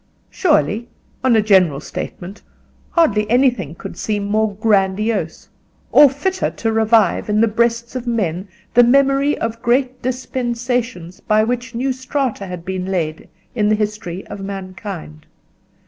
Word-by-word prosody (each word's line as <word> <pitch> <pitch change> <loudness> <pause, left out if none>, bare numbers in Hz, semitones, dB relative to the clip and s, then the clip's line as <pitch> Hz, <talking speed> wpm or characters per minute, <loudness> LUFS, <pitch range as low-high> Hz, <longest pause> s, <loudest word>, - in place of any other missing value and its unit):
Surely, 230 - +1 0.3
on 255 -3 +4
a 220 - +4
general 185 -9 +4
statement, 180 +5 -7 0.5
hardly 210 - +2
anything 240 - +2
could - - -8
seem 205 +2 -2
more 215 0 0
grandiose, 200 -3 0 0.4
or 290 -1 +8
fitter 370 +8 -1
to 225 - -2
revive 220 -3 +2
in 210 0 +2
the 230 - +4
breasts 235 +2 0
of 250 -1 -4
men 190 -5 -1 0.3
the 245 - +7
memory 275 +3 +3
of 230 0 -4
great 255 +1 +1
dispensations 245 -6 -3
by 215 0 +2
which 240 +1 -3
new 260 +3 0
strata 260 -5 -3
had 180 -2 -7
been 185 -1 -3
laid 165 -5 -3 0.2
in 210 -3 +1
the 215 - +4
history 210 -4 -4
of - - -8
mankind. 190 -5 -7
220 Hz, 140 wpm, -19 LUFS, 190-245 Hz, 0.5 s, or